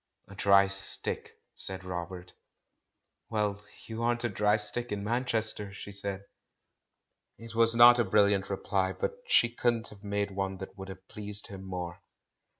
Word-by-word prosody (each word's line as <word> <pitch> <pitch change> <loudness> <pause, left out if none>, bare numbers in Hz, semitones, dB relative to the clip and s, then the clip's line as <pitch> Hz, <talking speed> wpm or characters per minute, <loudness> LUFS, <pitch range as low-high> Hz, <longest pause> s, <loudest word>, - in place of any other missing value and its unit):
"A - - -11
dry 100 0 +5
stick," 100 0 -2 0.2
said 95 0 -2
Robert. 90 0 -6 1.0
"Well, 105 -2 -1 0.2
you 115 0 -6
aren't 120 0 0
a 120 - 0
dry 105 +1 +2
stick 110 +3 -4
in 100 -1 -3
Manchester!'* 110 -3 +1
she 100 - -8
said. 100 -1 -4 1.1
It 115 0 -10
was 115 0 +5
not 120 +1 +8
a - - +4
brilliant 100 -1 +2
reply, 95 -1 -1
but - - -2
she 120 - +5
couldn't 120 -1 0
have 100 -1 -15
made 100 0 -2
one 95 0 -3
that 95 - -9
would 95 -1 -8
have 95 0 -11
pleased 105 0 -4
him 95 -1 -8
more. 90 -2 -6
100 Hz, 155 wpm, -30 LUFS, 95-110 Hz, 1.1 s, not